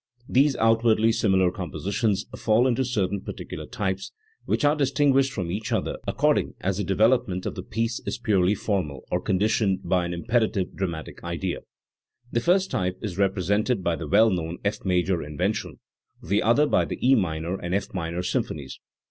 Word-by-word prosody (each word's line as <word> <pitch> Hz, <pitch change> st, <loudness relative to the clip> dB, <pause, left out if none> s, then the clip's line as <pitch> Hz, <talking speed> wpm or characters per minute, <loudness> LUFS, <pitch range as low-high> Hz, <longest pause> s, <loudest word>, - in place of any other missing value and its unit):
These 135 Hz, +1 st, +3 dB
outwardly 115 Hz, 0 st, +3 dB
similar 95 Hz, -5 st, +2 dB
compositions 100 Hz, +3 st, -2 dB
fall 115 Hz, +2 st, +2 dB
into 130 Hz, 0 st, +2 dB
certain 100 Hz, -6 st, -1 dB
particular -, -, -7 dB
types, 95 Hz, -1 st, -3 dB, 0.3 s
which -, -, 0 dB
are 145 Hz, +1 st, +4 dB
distinguished 135 Hz, -1 st, +2 dB
from 90 Hz, -8 st, -3 dB
each 105 Hz, +4 st, -4 dB
other -, -, -1 dB
according -, -, +1 dB
as 95 Hz, 0 st, -1 dB
the 105 Hz, -, -1 dB
development 100 Hz, -1 st, +2 dB
of -, -, -2 dB
the 90 Hz, -, -6 dB
piece 115 Hz, +5 st, -2 dB
is -, -, -2 dB
purely 105 Hz, -4 st, +2 dB
formal 90 Hz, -, -2 dB
or 90 Hz, -, 0 dB
conditioned 100 Hz, 0 st, +1 dB
by 90 Hz, -2 st, +1 dB
an 85 Hz, -, -3 dB
imperative 110 Hz, 0 st, 0 dB
dramatic 85 Hz, -5 st, -5 dB
idea. 85 Hz, +1 st, -3 dB, 0.7 s
The 120 Hz, -, +1 dB
first 185 Hz, +8 st, +2 dB
type 90 Hz, 0 st, -1 dB
is 100 Hz, -3 st, -4 dB
represented 100 Hz, +3 st, +1 dB
by 85 Hz, -1 st, +1 dB
the 80 Hz, -2 st, -6 dB
well 110 Hz, +6 st, +5 dB
known 85 Hz, -1 st, -2 dB
F 105 Hz, +1 st, -1 dB
major 90 Hz, -1 st, +1 dB
Invention, 75 Hz, 0 st, -3 dB, 0.4 s
the 100 Hz, +5 st, 0 dB
other 120 Hz, +7 st, +4 dB
by -, -, +2 dB
the -, -, -5 dB
E 135 Hz, -, +7 dB
minor 85 Hz, -4 st, 0 dB
and 90 Hz, +1 st, -2 dB
F 100 Hz, -1 st, -3 dB
minor 85 Hz, -1 st, -3 dB
symphonies. 70 Hz, -5 st, -3 dB
100 Hz, 170 wpm, -25 LUFS, 90-115 Hz, 0.7 s, E